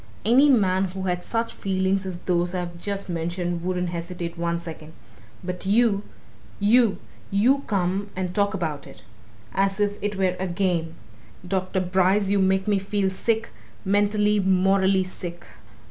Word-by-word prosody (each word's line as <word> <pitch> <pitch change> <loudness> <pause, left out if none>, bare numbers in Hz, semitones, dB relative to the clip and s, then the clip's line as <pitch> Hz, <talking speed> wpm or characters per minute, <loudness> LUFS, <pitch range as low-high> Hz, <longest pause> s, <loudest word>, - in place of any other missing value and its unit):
Any 260 +6 +6
man 195 -7 +3
who 190 +1 -5
had 180 -1 -1
such 230 0 -2
feelings 190 0 0
as 180 -2 -4
those 175 0 0
I've 175 -1 -3
just 200 +2 -3
mentioned 175 0 -2
wouldn't 180 -1 -1
hesitate 170 0 -5
one 170 0 -1
second. 160 -2 -9 0.5
But 180 +1 -4
you 210 -1 +3 0.6
you! 220 +1 +4 0.3
you 235 +8 +3
come 195 0 0
and 180 -1 -3
talk 200 +1 +1
about 155 -6 -3
it! - - -14 0.5
As 195 +1 +1
if 205 0 0
it 205 0 -2
were 190 -2 +1
a 190 - -1
game! 175 -3 -1 0.5
Dr. 185 0 -1
Bryce, 190 +2 +2
you 200 - +3
make 190 0 +2
me 205 -2 +3
feel 195 0 -1
sick, 225 +4 -1 0.3
mentally, 205 +1 +2
morally 190 0 +3
sick." 175 -2 -7
190 Hz, 150 wpm, -24 LUFS, 180-200 Hz, 0.6 s, Any